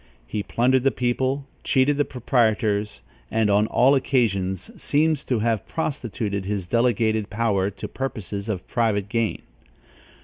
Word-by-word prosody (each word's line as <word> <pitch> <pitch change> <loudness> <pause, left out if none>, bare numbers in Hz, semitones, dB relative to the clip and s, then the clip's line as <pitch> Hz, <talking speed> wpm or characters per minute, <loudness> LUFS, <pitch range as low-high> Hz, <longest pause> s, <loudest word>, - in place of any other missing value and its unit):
He 105 - -3
plundered 125 +5 +2
the 135 - +3
people, 130 +2 -1 0.2
cheated 135 +2 +2
the 145 - +2
proprietors, 110 -4 0 0.3
and 110 -2 +2
on 105 +2 +3
all 130 +5 +4
occasions 100 -9 0
seems 155 -1 +1
to 125 - 0
have 110 -1 0
prostituted 115 -10 -3
his 100 -1 -3
delegated 110 -1 +1
power 105 -3 +1
to 100 - -7
purposes 110 -5 -4
of 95 -4 -3
private 105 -5 0
gain. 115 0 -1
115 Hz, 135 wpm, -24 LUFS, 100-130 Hz, 0.3 s, all